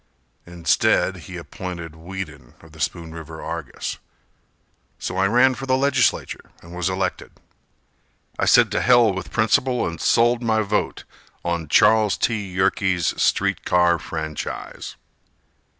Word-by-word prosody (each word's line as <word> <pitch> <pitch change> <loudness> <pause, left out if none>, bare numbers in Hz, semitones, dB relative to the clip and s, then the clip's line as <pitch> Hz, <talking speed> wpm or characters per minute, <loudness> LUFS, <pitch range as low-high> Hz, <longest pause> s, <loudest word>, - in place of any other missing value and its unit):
Instead 85 -2 +1
he - - -6
appointed 85 -3 -7
Whedon 80 -7 -8
of 80 - -17
the 80 - -15
Spoon 80 +1 -3
River 80 -1 -9
Argus, 80 -4 -5 1.0
So 95 - -5
I 95 +1 +3
ran 125 +5 +4
for 135 +1 -7
the 130 0 +3
legislature 140 0 0
and 85 - -12
was 90 +1 -1
elected. 95 -1 -3 1.1
I - - +2
said - - +5
to - - 0
hell 120 -4 +5
with 95 -1 -6
principle 120 +3 +1
and 85 -1 -5
sold 120 +1 +3
my 110 -2 +1
vote 105 +1 -2 0.4
On 85 -2 -2
Charles 110 +6 +4
T. 110 -3 0
Yerkes' 95 -1 +1
street - - +1
car 90 -1 +3
franchise. 80 -2 -6
90 Hz, 135 wpm, -22 LUFS, 85-110 Hz, 1.1 s, said